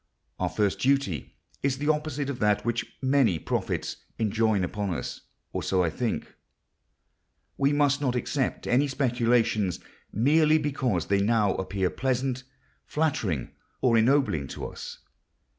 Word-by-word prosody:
Our -, -, 0 dB
first 105 Hz, -2 st, 0 dB
duty 135 Hz, -, 0 dB, 0.3 s
is 135 Hz, -1 st, 0 dB
the 145 Hz, +2 st, -1 dB
opposite 150 Hz, -2 st, 0 dB
of 125 Hz, -, -7 dB
that 105 Hz, -1 st, +2 dB
which 120 Hz, 0 st, -2 dB
many 130 Hz, -, +3 dB
prophets -, -, -2 dB, 0.2 s
enjoin 110 Hz, -2 st, +1 dB
upon 100 Hz, +2 st, -2 dB
us—or -, -, -7 dB
so 95 Hz, -1 st, +1 dB
I 85 Hz, -, 0 dB
think. 120 Hz, +6 st, -3 dB, 1.2 s
We 140 Hz, +1 st, +2 dB
must 145 Hz, -1 st, +2 dB
not 130 Hz, -3 st, 0 dB
accept 130 Hz, +2 st, -1 dB
any 135 Hz, +4 st, +3 dB
speculations 120 Hz, -, +1 dB, 0.3 s
merely 155 Hz, +7 st, +4 dB
because 130 Hz, -, 0 dB
they 100 Hz, 0 st, +2 dB
now 105 Hz, -2 st, +3 dB
appear 95 Hz, -1 st, -1 dB
pleasant, 130 Hz, 0 st, -1 dB, 0.4 s
flattering, 110 Hz, -, -1 dB, 0.3 s
or 120 Hz, -3 st, +3 dB
ennobling 115 Hz, -, +3 dB
to -, -, -6 dB
us. -, -, -7 dB
120 Hz, 130 wpm, -27 LUFS, 100-140 Hz, 1.2 s, merely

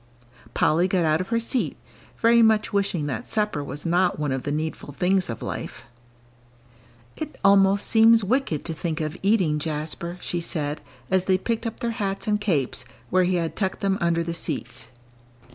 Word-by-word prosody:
Polly 170 Hz, +4 st, +3 dB
got 180 Hz, -2 st, +1 dB
out 155 Hz, +2 st, +2 dB
of 185 Hz, -, -5 dB
her 230 Hz, +1 st, +1 dB
seat, 235 Hz, +2 st, -1 dB, 0.4 s
very 235 Hz, 0 st, +5 dB
much 220 Hz, -1 st, +3 dB
wishing 195 Hz, -6 st, 0 dB
that 145 Hz, -, -4 dB
supper 210 Hz, -9 st, -1 dB
was 140 Hz, +3 st, -7 dB
not 175 Hz, +2 st, +2 dB
one 150 Hz, -2 st, -1 dB
of 130 Hz, 0 st, -1 dB
the 145 Hz, -, -3 dB
needful 155 Hz, -1 st, -4 dB
things 185 Hz, +2 st, +1 dB
of 115 Hz, -, -5 dB
life. -, -, -6 dB, 1.3 s
"It 310 Hz, -1 st, -6 dB
almost 195 Hz, 0 st, +5 dB
seems 225 Hz, 0 st, +5 dB
wicked 220 Hz, -, 0 dB
to 165 Hz, -, -1 dB
think 160 Hz, +1 st, -3 dB
of 155 Hz, 0 st, -3 dB
eating, 190 Hz, -7 st, +2 dB
Jasper," 160 Hz, +3 st, -3 dB
she 175 Hz, -1 st, -3 dB
said, 150 Hz, -3 st, -2 dB, 0.3 s
as 190 Hz, -1 st, +2 dB
they 190 Hz, -1 st, +3 dB
picked 230 Hz, +4 st, -2 dB
up 225 Hz, -, -7 dB
their 235 Hz, -, -1 dB
hats 200 Hz, -3 st, -3 dB
and 210 Hz, -1 st, 0 dB
capes, 145 Hz, -, 0 dB, 0.3 s
where 185 Hz, 0 st, +4 dB
he 185 Hz, +1 st, +1 dB
had 165 Hz, -2 st, -2 dB
tucked 190 Hz, -2 st, -2 dB
them 195 Hz, 0 st, +1 dB
under 170 Hz, -1 st, +1 dB
the 170 Hz, 0 st, -3 dB
seats. 125 Hz, -8 st, -3 dB
180 Hz, 180 wpm, -24 LUFS, 155-205 Hz, 1.3 s, very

